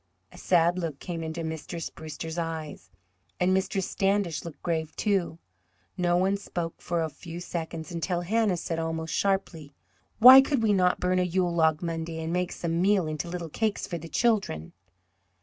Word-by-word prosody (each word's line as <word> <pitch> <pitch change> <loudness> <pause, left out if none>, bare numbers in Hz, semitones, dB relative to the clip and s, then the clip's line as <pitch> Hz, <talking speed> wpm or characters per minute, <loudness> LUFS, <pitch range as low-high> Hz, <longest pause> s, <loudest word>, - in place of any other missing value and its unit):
A - - -14
sad 175 0 +3
look 165 -5 -3
came 170 +2 -5
into 160 +1 -4
Mistress 160 +1 -5
Brewster's 160 +1 -6
eyes, 160 -2 -5 0.5
and 180 +1 +3
Mistress 190 0 0
Standish 195 -4 0
looked 165 -3 -10
grave, 160 -2 -2
too. 195 -6 0 0.6
No 175 -1 +2
one 190 +2 +2
spoke 175 -4 -5
for 170 -2 -1
a - - 0
few 165 +3 -9
seconds, 165 -1 -5
until 170 +1 -2
Hannah 205 0 +1
said 165 0 -3
almost 160 0 -3
sharply: 175 -7 -1 0.4
"Why 255 +3 +11
could 270 -3 0
we 215 -2 +3
not 180 -2 +2
burn 185 0 +1
a - - +3
Yule 180 0 0
log 160 -1 +2
Monday, 165 -1 -3
and 160 +1 -3
make 180 0 0
some 170 0 -2
meal 195 -2 +3
into 155 +2 -4
little 170 -2 -5
cakes 215 +6 -1
for 170 -2 -5
the 165 +1 -9
children?" 200 - 0
170 Hz, 175 wpm, -27 LUFS, 160-185 Hz, 0.6 s, Why